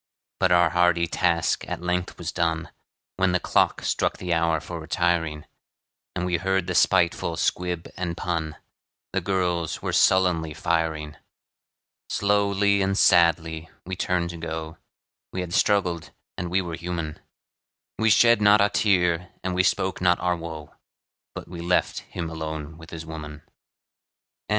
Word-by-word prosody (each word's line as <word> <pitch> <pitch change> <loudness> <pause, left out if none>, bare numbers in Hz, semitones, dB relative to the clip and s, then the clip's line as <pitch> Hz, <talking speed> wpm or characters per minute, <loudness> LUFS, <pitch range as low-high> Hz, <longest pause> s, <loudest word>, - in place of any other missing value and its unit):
But 95 - +2
our 85 -1 +5
hearty 90 -1 +3
task 85 -1 0
at - - -3
length 90 0 -2
was - - -4
done, 80 -2 -1 0.5
When 95 -1 +2
the 90 - +2
clock - - +1
struck - - 0
the 90 -1 -2
hour 80 -1 +2
for 85 +1 -7
retiring; 80 -2 -1 0.7
And 90 -1 -1
we 90 -1 +1
heard 95 +1 0
the 90 - -3
spiteful - - +2
squib 90 -2 -1
and 85 -2 -4
pun 80 -3 -2 0.6
The - - 0
girls 90 -4 -1
were - - -2
sullenly 85 -5 +3
firing. 80 -2 -1 0.9
Slowly 100 0 +2
and 95 0 0
sadly 85 -3 +3 0.2
we 95 +1 -4
turned 90 -1 -1
to 85 - -8
go, 80 0 -6 0.5
We 95 - -3
had 85 -1 -6
struggled, 90 -7 +1 0.3
and 90 - -4
we 95 +2 +1
were 85 -1 -6
human; 85 -2 -4 0.8
We 110 0 +3
shed 115 +1 +5
not 105 +1 +6
a 100 +1 +4
tear, 90 -4 +1
and 95 0 -2
we 90 - +3
spoke 95 +1 0
not 90 -1 +3
our 90 0 +1
woe, 80 -3 -8 0.6
But - - -7
we 85 -1 -8
left 90 +1 +1
him 85 - -6
alone 80 -1 -5
with 80 -1 -12
his 80 -1 -7
woman. 75 -2 -8
85 Hz, 150 wpm, -25 LUFS, 80-90 Hz, 0.9 s, not